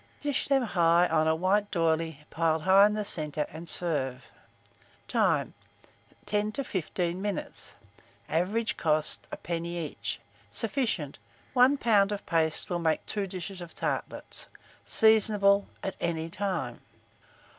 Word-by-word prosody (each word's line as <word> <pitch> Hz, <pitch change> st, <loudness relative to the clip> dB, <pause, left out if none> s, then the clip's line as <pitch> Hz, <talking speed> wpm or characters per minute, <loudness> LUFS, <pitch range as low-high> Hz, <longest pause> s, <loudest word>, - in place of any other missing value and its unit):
Dish 290 Hz, -2 st, -1 dB
them 275 Hz, -2 st, +3 dB
high 175 Hz, -4 st, +3 dB
on 160 Hz, -1 st, +2 dB
a 160 Hz, -, +3 dB
white 200 Hz, +5 st, +1 dB
d'oyley, 160 Hz, -3 st, 0 dB
piled 160 Hz, -1 st, +1 dB
high 195 Hz, +3 st, +7 dB
in 210 Hz, -, -2 dB
the 210 Hz, -1 st, -2 dB
centre, 150 Hz, -5 st, -2 dB
and 165 Hz, +2 st, -7 dB
serve. 135 Hz, -7 st, -2 dB, 0.8 s
Time. -, -, +1 dB, 0.7 s
10 210 Hz, +1 st, 0 dB
to 275 Hz, -, -2 dB
15 180 Hz, -4 st, -2 dB
minutes. 205 Hz, -2 st, -5 dB, 0.5 s
Average 200 Hz, +8 st, 0 dB
cost, 155 Hz, -1 st, 0 dB
1d. 170 Hz, 0 st, -4 dB
each. 170 Hz, -2 st, -4 dB, 0.3 s
Sufficient. 225 Hz, -, -2 dB, 0.3 s
1 260 Hz, +3 st, +5 dB
lb. 210 Hz, -5 st, +3 dB
of 205 Hz, -, -4 dB
paste 160 Hz, -1 st, 0 dB
will 175 Hz, -, 0 dB
make 160 Hz, -2 st, 0 dB
2 205 Hz, -2 st, -2 dB
dishes 185 Hz, 0 st, -6 dB
of 170 Hz, -1 st, -9 dB
tartlets. -, -, -4 dB, 0.4 s
Seasonable 210 Hz, -2 st, +4 dB, 0.2 s
at 190 Hz, -, -3 dB
any 165 Hz, -1 st, -1 dB
time. 175 Hz, -11 st, -3 dB
180 Hz, 130 wpm, -28 LUFS, 160-205 Hz, 0.8 s, high